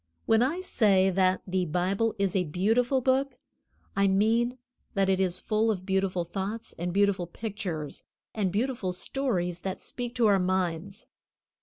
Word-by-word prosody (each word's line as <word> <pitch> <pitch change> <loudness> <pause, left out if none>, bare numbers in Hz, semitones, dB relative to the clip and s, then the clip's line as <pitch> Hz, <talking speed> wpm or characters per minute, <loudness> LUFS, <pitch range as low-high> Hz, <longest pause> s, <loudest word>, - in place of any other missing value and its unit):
When 225 0 +4
I 305 +9 +1
say 195 - +3
that 185 0 +2
the 185 -1 0
Bible 190 +7 0
is 200 -2 0
a 185 -2 +2
beautiful 225 - +1
book, 265 +2 +1 0.6
I 200 0 +3
mean 225 +6 +2 0.4
that 195 -1 +2
it 190 -1 +2
is 185 -1 +1
full 220 +2 +1
of 185 -4 -2
beautiful 190 -2 0
thoughts 200 +6 -4
and 175 +1 -2
beautiful 195 -2 +2
pictures 175 -7 -5 0.3
and 200 -4 0
beautiful 215 -3 -1
stories 180 -5 -1
that 190 -1 -4
speak 245 -1 -5
to 240 - +3
our 200 -2 +5
minds. 185 +1 -1
195 Hz, 155 wpm, -28 LUFS, 185-225 Hz, 0.6 s, our